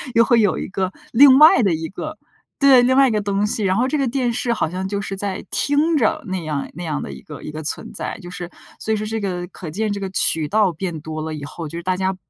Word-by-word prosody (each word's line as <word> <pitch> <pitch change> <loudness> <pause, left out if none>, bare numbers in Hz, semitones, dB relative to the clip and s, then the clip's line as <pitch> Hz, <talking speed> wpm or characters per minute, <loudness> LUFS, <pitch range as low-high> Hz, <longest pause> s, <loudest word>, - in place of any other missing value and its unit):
又 230 - +6
会 235 -1 +4
有 205 -3 +2
一 - - -4
个， 190 -1 -2 0.2
另 265 +2 +8
外 300 -5 +7
的 190 -4 +2
一 160 0 -3
个 310 - -7 0.4
对， 275 -3 +7
另 255 +1 +3
外 275 0 +6
一 - - -1
个 215 - +1
东 200 0 0
西。 210 +1 -1
然 190 -1 +1
后 245 +5 +1
这 300 - 0
个 275 -2 0
电 245 0 0
视 240 0 -1
好 215 - -1
像 185 +2 -4
就 200 +1 -3
是 195 -1 -5
在 195 0 -4
听 300 +3 +2
着， 230 -6 +1
那 185 -2 -3
样 150 -3 -3
那 175 - -6
样 150 -2 -2
的 - - -6
一 - - -10
个 150 - -11
一 - - -6
个 155 +1 -6
存 150 - -3
在。 - - -5
就 175 - -9
是 175 -1 -7 0.3
所 220 - -1
以 - - +2
说 215 - -4
这 220 +1 -3
个， 180 -3 -3
可 175 -2 -9
见 210 +6 -2
这 200 - -3
个 195 -1 -4
渠 160 -4 +3
道 205 +1 +2
变 170 -1 -5
多 155 0 -6
了 160 0 -4
以 150 -2 -7
后， 160 +3 -7
就 165 - -7
是 170 - -6
大 185 +1 -1
家 190 0 -1
195 Hz, 310 characters per minute, -20 LUFS, 170-235 Hz, 0.4 s, 另